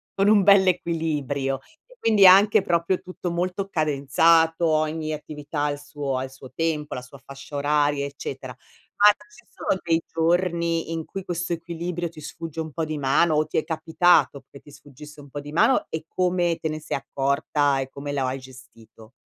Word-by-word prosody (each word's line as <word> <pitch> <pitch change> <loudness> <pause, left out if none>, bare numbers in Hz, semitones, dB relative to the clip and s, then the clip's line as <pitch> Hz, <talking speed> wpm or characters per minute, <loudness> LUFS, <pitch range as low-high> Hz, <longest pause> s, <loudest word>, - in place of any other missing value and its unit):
con 195 +1 +2
un 210 -1 +6
bell' 200 -1 +6
equilibrio 150 -6 -1 0.3
e - - -20
quindi 215 - +4
anche 200 +3 +7
proprio 170 +2 +1
tutto 185 -1 -6
molto 180 +3 -2
cadenzato, 160 +1 +2
ogni 155 0 0
attività 150 0 -6
ha - - +1
il 145 0 -4
suo 145 -2 -4
ha 130 - -2
il 130 - -7
suo 135 0 -12
il - - -24
tempo, 155 -2 -2
la 125 - -5
sua 130 +2 -14
fascia 140 +1 -11
oraria, 145 0 +1
eccetera. 135 -2 -7 0.5
Ma 210 0 +9 0.2
ci 240 0 -19
sono 190 - -2
dei 165 0 +1
giorni, 170 0 0
in 165 -1 -3
cui 195 - -7
questo 175 0 -3
equilibrio 170 +1 -4
ti 160 - -14
sfugge 165 +1 -8
un 160 -2 -5
po' 165 - -2
di 155 -1 -3
mano, 145 +4 +2
o 155 +1 +2
ti - - -10
è 155 - +2
capitato 160 -3 +2
che 140 - -12
ti 145 - -17
sfuggisse 145 +1 -13
un 140 - -15
po' 145 - -6
di 145 +1 -9
mano? 255 +10 +3
E 160 0 -4
come 175 -1 0
te - - -2
ne 155 0 -4
se - - -3
accorta 140 +1 0
e 135 - -3
come 140 +1 -7
la 140 -2 -1
o - - -1
hai 130 +1 -3
gestito? 125 -4 -16
155 Hz, 200 wpm, -24 LUFS, 140-170 Hz, 0.5 s, Ma